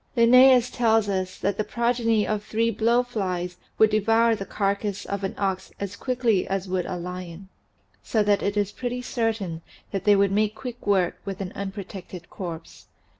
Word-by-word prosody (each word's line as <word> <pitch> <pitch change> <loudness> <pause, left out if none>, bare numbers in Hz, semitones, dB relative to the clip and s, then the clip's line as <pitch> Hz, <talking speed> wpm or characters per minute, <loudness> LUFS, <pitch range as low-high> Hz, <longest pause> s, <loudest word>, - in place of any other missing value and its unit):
Linnaeus 250 +1 +6
tells 225 -3 +2
us 185 -2 -2
that 200 0 -1
the 215 - 0
progeny 235 -2 +1
of 210 -1 -2
three 230 +2 0
blowflies 215 -6 0 0.2
would 220 0 +5
devour 225 +2 +3
the 195 -3 -4
carcass 200 0 -2
of 200 0 -4
an 195 - -3
ox 190 -2 -2
as 200 0 -4
quickly 245 -6 0
as 195 0 -2
would 185 -1 -1
a 185 - -3
lion. 180 +1 -7 0.5
So 220 -2 +1
that 205 -1 +2
it 200 +1 -1
is 205 -1 +1
pretty 245 +2 -4
certain 220 -9 -2 0.3
that 195 -2 -3
they 205 -1 +6
would 200 -1 +3
make 210 +1 +1
quick 245 -1 -8
work 190 -4 +2
with 195 -2 -5
an 190 -1 -4
unprotected 195 -3 -7
corpse. 170 -3 -8
205 Hz, 175 wpm, -25 LUFS, 190-230 Hz, 0.5 s, Linnaeus